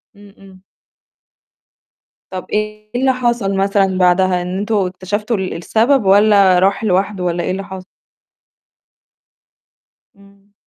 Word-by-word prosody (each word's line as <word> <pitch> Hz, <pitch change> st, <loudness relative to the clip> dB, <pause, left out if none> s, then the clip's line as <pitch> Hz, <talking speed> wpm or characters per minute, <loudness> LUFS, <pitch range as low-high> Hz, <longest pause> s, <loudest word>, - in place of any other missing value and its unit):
إمم، 200 Hz, 0 st, -17 dB
إمم. 190 Hz, -1 st, -17 dB, 1.7 s
طَب 185 Hz, -1 st, -6 dB
إيه 215 Hz, 0 st, -4 dB
اللي 260 Hz, +1 st, +2 dB
حصل 235 Hz, -6 st, -1 dB
مثلًا 195 Hz, -1 st, +1 dB
بعدها 180 Hz, 0 st, +2 dB
إن 180 Hz, +1 st, -4 dB
أنتم 210 Hz, +2 st, -2 dB
اكتشفتوا 205 Hz, +3 st, -2 dB
ال 190 Hz, -1 st, -4 dB
السبب 225 Hz, +8 st, +1 dB
والّا 200 Hz, -2 st, +5 dB
راح 195 Hz, +3 st, +1 dB
لوحده 195 Hz, -1 st, 0 dB
والّا 175 Hz, -1 st, -1 dB
إيه -, -, -2 dB
اللي 195 Hz, +1 st, -4 dB
حصل؟ 190 Hz, -2 st, -9 dB, 2.3 s
إمم. 200 Hz, 0 st, -23 dB
195 Hz, 120 wpm, -16 LUFS, 185-210 Hz, 2.3 s, والّا